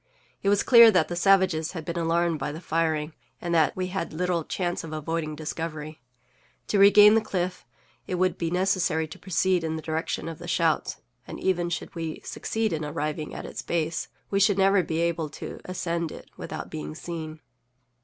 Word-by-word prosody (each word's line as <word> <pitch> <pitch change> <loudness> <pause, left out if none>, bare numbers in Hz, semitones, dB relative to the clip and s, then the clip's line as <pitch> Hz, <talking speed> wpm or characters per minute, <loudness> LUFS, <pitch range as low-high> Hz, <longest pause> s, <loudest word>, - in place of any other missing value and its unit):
It 200 - +1
was 205 0 +3
clear 235 -2 +9
that 180 -7 +3
the 175 - -3
savages 180 -3 +3
had 160 -4 -6
been 170 - -4
alarmed 165 -1 +1
by 145 - -2
the 155 - -7
firing, 160 -2 -1 0.3
and 170 0 -3
that 160 -4 +3
we 185 -1 -2
had 185 -3 -3
little 175 0 0
chance 175 +2 -2
of 160 - -7
avoiding 155 0 -3
discovery. 155 -1 -5 0.7
To 205 - +2
regain 205 +1 +8
the 225 - +4
cliff, 180 -4 -3 0.4
it 185 - -2
would 185 -1 +1
be 170 -2 -2
necessary 180 -3 +1
to 150 - -11
proceed 185 -1 +1
in 160 0 -2
the 160 - -4
direction 160 +1 -2
of 165 0 -6
the 175 - -8
shouts, 165 -3 +1 0.3
and - - -7
even 175 -2 0
should 175 - -4
we 165 -3 -4
succeed 220 -4 -2
in 160 -1 -2
arriving 150 +1 -3
at - - -6
its - - -6
base, 165 -1 -2 0.2
we 195 - +2
should 200 0 +4
never 195 0 +4
be 165 -1 -2
able 170 -2 0
to - - -8
ascend 170 -2 -2
it - - -11
without - - -7
being 75 0 -6
seen. 160 -2 -6
170 Hz, 195 wpm, -26 LUFS, 160-185 Hz, 0.7 s, clear